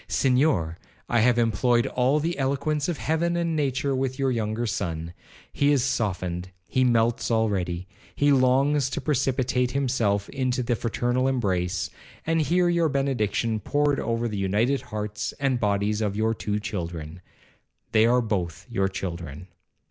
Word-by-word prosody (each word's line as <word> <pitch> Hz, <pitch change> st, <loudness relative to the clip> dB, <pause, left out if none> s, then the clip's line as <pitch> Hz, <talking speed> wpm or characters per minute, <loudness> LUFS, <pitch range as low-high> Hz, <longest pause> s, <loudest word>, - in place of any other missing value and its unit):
'Senhor, 125 Hz, -, +1 dB, 0.3 s
I 120 Hz, -, +2 dB
have 120 Hz, +2 st, +4 dB
employed 120 Hz, +1 st, +2 dB
all 130 Hz, +4 st, +1 dB
the 165 Hz, +3 st, -1 dB
eloquence 140 Hz, +3 st, 0 dB
of 170 Hz, -, -2 dB
heaven 170 Hz, +3 st, 0 dB
and 170 Hz, -1 st, 0 dB
nature 140 Hz, -2 st, 0 dB
with 130 Hz, 0 st, -2 dB
your 135 Hz, -2 st, +1 dB
younger 110 Hz, 0 st, -1 dB
son. 85 Hz, -5 st, -3 dB, 0.4 s
He 145 Hz, 0 st, +3 dB
is 140 Hz, -4 st, +3 dB
softened,—he 90 Hz, -3 st, -2 dB
melts 120 Hz, -1 st, +2 dB
already,—he 100 Hz, +3 st, -1 dB
longs 135 Hz, +1 st, +3 dB
to -, -, -3 dB
precipitate 130 Hz, -3 st, 0 dB
himself 115 Hz, -7 st, 0 dB
into 130 Hz, -2 st, -1 dB
the 120 Hz, 0 st, 0 dB
fraternal 120 Hz, +3 st, 0 dB
embrace, 95 Hz, -8 st, -1 dB, 0.3 s
and 165 Hz, 0 st, +2 dB
hear 175 Hz, +3 st, +2 dB
your 170 Hz, -2 st, +2 dB
benediction 115 Hz, -5 st, 0 dB
poured 145 Hz, +6 st, +1 dB
over 115 Hz, +1 st, -1 dB
the 105 Hz, -3 st, -3 dB
united 110 Hz, +8 st, +1 dB
hearts 105 Hz, -1 st, -4 dB
and 135 Hz, -3 st, +1 dB
bodies 105 Hz, 0 st, 0 dB
of 105 Hz, -2 st, -1 dB
your 110 Hz, +1 st, +1 dB
two 105 Hz, -1 st, -2 dB
children,—they 90 Hz, +2 st, -4 dB
are 125 Hz, +1 st, +4 dB
both 90 Hz, -7 st, -3 dB
your 100 Hz, -6 st, 0 dB
children. 85 Hz, -3 st, -6 dB
120 Hz, 140 wpm, -25 LUFS, 100-135 Hz, 0.4 s, have